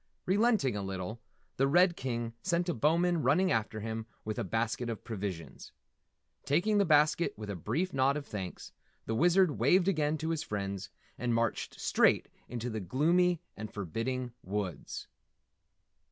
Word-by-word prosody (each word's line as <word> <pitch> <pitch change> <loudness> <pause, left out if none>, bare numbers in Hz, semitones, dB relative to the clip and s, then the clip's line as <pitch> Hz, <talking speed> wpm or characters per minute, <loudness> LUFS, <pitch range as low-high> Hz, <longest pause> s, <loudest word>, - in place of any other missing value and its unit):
Relenting 200 - +3
a 100 - -2
little, 95 +3 -5 0.4
the 135 - +3
Red 175 +4 +5
King 120 -4 -3
sent 175 -1 0
a 175 - +1
Bowman 165 +5 +2
running 165 +8 +3
after 110 -1 -1
him 110 +1 -4 0.2
with 110 +2 -3
a - - 0
basket 115 +4 -1
of 115 - -5
provisions. 95 - -6 0.7
Taking 200 +9 +2
the 200 - +4
basket 155 +1 +3
with 105 -1 -5
a - - -4
brief 170 - -2
nod 135 +1 +3
of 145 - -5
thanks, 95 -7 -6 0.3
the 115 - -2
Wizard 175 +4 +3
waved 175 +10 +4
again 155 -4 +1
to 160 +2 -3
his 160 -2 -1
friends 100 -6 -4 0.3
and 120 -2 0
marched 115 0 -1
straight - - +3 0.2
into 120 0 -4
the 110 - -3
gloomy 165 - +2
and 110 -1 -7
forbidding 115 +6 -3
woods. 95 -5 -4
125 Hz, 155 wpm, -31 LUFS, 110-170 Hz, 0.7 s, Red